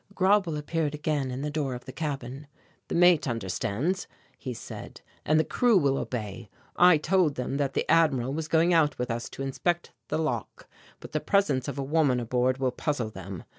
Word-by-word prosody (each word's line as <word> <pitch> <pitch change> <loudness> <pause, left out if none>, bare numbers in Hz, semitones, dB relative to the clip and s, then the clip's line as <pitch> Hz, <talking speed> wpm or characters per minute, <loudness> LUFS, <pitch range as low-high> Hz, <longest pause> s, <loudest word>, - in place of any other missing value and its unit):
Grauble 190 -4 +3
appeared 150 0 -2
again 150 -3 -1
in 130 +2 -4
the 150 - -2
door 145 -4 -2
of 125 - -9
the 130 - -7
cabin. 140 -2 -5 0.4
"The - - -3
mate 175 -3 +5
understands," 120 - -2 0.3
he 130 - -6
said, 120 - -9 0.3
"and 155 +1 +4
the - - +4
crew 240 +2 +3
will 140 -5 +2
obey. 105 -4 -5 0.3
I 180 -2 +7
told 160 -1 +2
them 130 +2 -3
that 140 -2 -1
the - - 0
Admiral 140 -6 +3
was 155 +1 -3
going 165 +3 +3
out 150 -4 +3
with 125 -1 -2
us 115 +1 -4
to 135 - -6
inspect 175 +6 -1 0.2
the - - -1
lock. 130 -9 -3 0.3
But - - -10
the 155 - 0
presence 150 -9 +1
of - - -4
a 140 - -2
woman 140 -3 +2
aboard 125 +2 +1
will 130 -1 0
puzzle 125 -5 -2
them. 95 -2 -8
145 Hz, 195 wpm, -27 LUFS, 125-160 Hz, 0.4 s, I